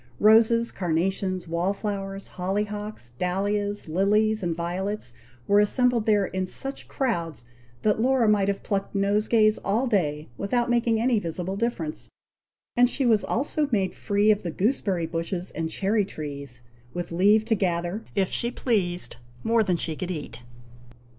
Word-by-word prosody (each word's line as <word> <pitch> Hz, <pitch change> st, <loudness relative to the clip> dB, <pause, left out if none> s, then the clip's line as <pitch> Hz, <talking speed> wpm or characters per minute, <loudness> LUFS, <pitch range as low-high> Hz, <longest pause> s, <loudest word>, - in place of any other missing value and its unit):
Roses, 225 Hz, +2 st, +5 dB
carnations, 185 Hz, +1 st, -1 dB
wall 170 Hz, +4 st, 0 dB
flowers, 195 Hz, -2 st, -4 dB
holly 190 Hz, +3 st, -1 dB
hocks, 210 Hz, -, -7 dB
dahlias, 205 Hz, +2 st, -1 dB
lilies, 210 Hz, +6 st, +2 dB
and 170 Hz, -3 st, -1 dB
violets, 175 Hz, -, -3 dB, 0.3 s
were 205 Hz, 0 st, +5 dB
assembled 235 Hz, +2 st, +2 dB
there 205 Hz, -2 st, +4 dB
in 185 Hz, 0 st, -3 dB
such 270 Hz, +8 st, -2 dB
crowds, 170 Hz, -, -2 dB, 0.4 s
that 215 Hz, 0 st, +2 dB
Laura 255 Hz, -2 st, +3 dB
might 205 Hz, -2 st, +3 dB
have 200 Hz, -1 st, -1 dB
plucked 200 Hz, -1 st, -2 dB
nosegays 210 Hz, +2 st, +3 dB
all 220 Hz, +6 st, +1 dB
day, 155 Hz, -, 0 dB
without 240 Hz, +4 st, 0 dB
making 235 Hz, -2 st, +2 dB
any 235 Hz, -1 st, +2 dB
visible 180 Hz, +1 st, -4 dB
difference; 200 Hz, -8 st, -3 dB, 0.7 s
and 245 Hz, 0 st, +5 dB
she 270 Hz, -, 0 dB
was 220 Hz, -3 st, +4 dB
also 290 Hz, +3 st, 0 dB
made 195 Hz, -5 st, +1 dB
free 205 Hz, +1 st, +2 dB
of 210 Hz, -, +1 dB
the 175 Hz, -, -4 dB
gooseberry 190 Hz, -, 0 dB
bushes 170 Hz, +3 st, -3 dB
and 160 Hz, 0 st, -3 dB
cherry 200 Hz, +5 st, +1 dB
trees, 140 Hz, -8 st, -6 dB, 0.3 s
with 175 Hz, -1 st, -4 dB
leave 205 Hz, +5 st, +4 dB
to 225 Hz, -, +1 dB
gather, 180 Hz, +1 st, -1 dB
if 195 Hz, -2 st, +2 dB
she 235 Hz, -, +1 dB
pleased, 185 Hz, -, 0 dB, 0.3 s
more 230 Hz, 0 st, +3 dB
than 185 Hz, -5 st, +1 dB
she 160 Hz, -1 st, 0 dB
could 185 Hz, +3 st, -5 dB
eat. 155 Hz, -8 st, -6 dB
200 Hz, 155 wpm, -25 LUFS, 175-220 Hz, 0.7 s, Roses